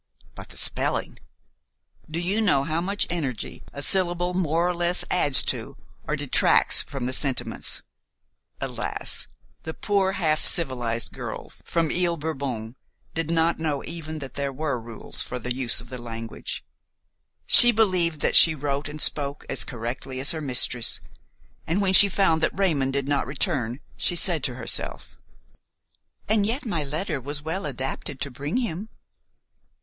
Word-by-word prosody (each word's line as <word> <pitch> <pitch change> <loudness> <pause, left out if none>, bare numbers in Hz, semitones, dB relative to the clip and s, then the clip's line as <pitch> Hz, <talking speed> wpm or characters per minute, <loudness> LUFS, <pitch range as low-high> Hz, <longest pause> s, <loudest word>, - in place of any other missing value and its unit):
But - - -11
the - - -12
spelling! - - -2 0.9
Do 160 +2 -3
you 190 +6 0
know 160 -11 +3
how 160 +3 -1
much 200 +3 -1
energy 140 -10 -4
a 140 - -5
syllable 175 0 +3
more 170 -1 +1
or 180 - 0
less 175 +1 +1
adds 145 -7 +6
to - - -3 0.3
or - - 0
detracts - - +3
from 135 -4 -6
the 130 - -1
sentiments? 135 0 -1 0.8
Alas! - - -4 0.3
the 160 - -6
poor 195 -2 +1
half 155 -5 0
civilized 120 - 0
girl - - -7
from 165 -2 0
Ile 175 -1 +1
Bourbon 135 -7 -4 0.4
did 165 -1 -2
not 165 0 +1
know 150 -3 -2
even 160 -2 -6
that 135 -4 -8
there 140 -1 -3
were 140 -3 -3
rules 115 -1 -7
for 125 - -4
the 125 +1 -3
use 125 -3 +2
of 120 - -14
the 125 -1 -7
language. 115 -1 -6 0.8
She 240 - +11
believed 185 -8 +1
that - - +1
she 165 -2 +8
wrote 145 0 -3
and 150 +1 -8
spoke 145 -1 0
as 135 - +2
correctly 125 +2 -5
as 135 - +2
her 160 - -4
mistress, 125 -3 +2 0.7
and 170 +5 0
when 195 -2 +1
she 200 +1 +8
found 180 -4 +2
that 160 - 0
Raymon 155 -9 +1
did 140 0 -2
not 145 -1 0
return 135 - -2 0.2
she 175 - 0
said 170 -4 +3
to 125 - -3
herself: 120 -2 -2 1.1
"And 215 -1 +2
yet 235 +7 -2
my 170 -9 -1
letter 150 +1 -3
was 145 +3 -6
well 165 +3 -3
adapted 135 +1 -5
to 140 - -3
bring 145 - -3
him." 220 -4 -3
155 Hz, 160 wpm, -25 LUFS, 135-175 Hz, 1.1 s, She